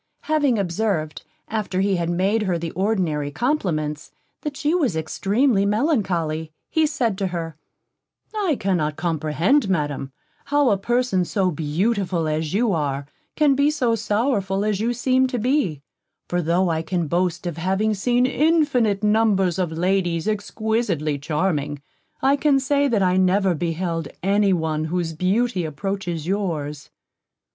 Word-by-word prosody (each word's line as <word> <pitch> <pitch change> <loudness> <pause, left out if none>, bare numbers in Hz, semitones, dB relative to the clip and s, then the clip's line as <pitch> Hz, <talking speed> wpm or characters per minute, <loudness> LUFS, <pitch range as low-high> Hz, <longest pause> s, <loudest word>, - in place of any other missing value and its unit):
Having 290 -6 +1
observed, 175 -5 -1 0.2
after 210 -4 -2
he 195 -1 +2
had 170 -1 -1
made 190 +6 +1
her 185 -4 0
the 165 -1 -4
ordinary 180 -7 0
compliments, 155 - -1 0.3
that 295 -2 -5
she 305 +1 0
was 290 - +1
extremely 200 - +1
melancholy, 190 - 0 0.2
he 320 -1 +3
said 245 -10 -1
to 195 - 0
her: 165 -3 -4 0.8
"I 390 -8 +1
cannot 165 -6 0
comprehend, 165 - +1
Madam, 145 -6 -1 0.3
how 290 -2 +3
a 200 - +3
person 240 -3 +1
so 185 0 0
beautiful 175 +3 -1
as 155 0 -1
you 220 +1 +2
are, 140 -3 -1 0.3
can 300 -2 +4
be 280 +2 +3
so 255 -6 +1
sorrowful 210 -3 0
as 210 -2 0
you 235 +2 +1
seem 255 +2 +2
to 255 -1 -3
be; 235 - 0 0.4
for 175 0 0
tho' 175 +3 +1
I 160 -1 0
can 170 +1 -2
boast 170 +2 -1
of 170 -2 -3
having 190 +5 +1
seen 245 +5 +2
infinite 265 -8 +2
numbers 210 -5 +2
of 175 -3 0
ladies 175 +1 0
exquisitely 210 -8 -1
charming, 150 -1 -1 0.4
I 275 +1 +4
can 285 -1 +3
say 280 +1 +2
that 220 -7 +1
I 185 0 +2
never 190 0 +3
beheld 165 0 -2 0.2
any 200 +1 +3
one 160 -3 0
whose 165 0 -2
beauty 190 +4 0
approaches 170 +1 -3
yours." 165 -7 -3
190 Hz, 145 wpm, -22 LUFS, 165-230 Hz, 0.8 s, can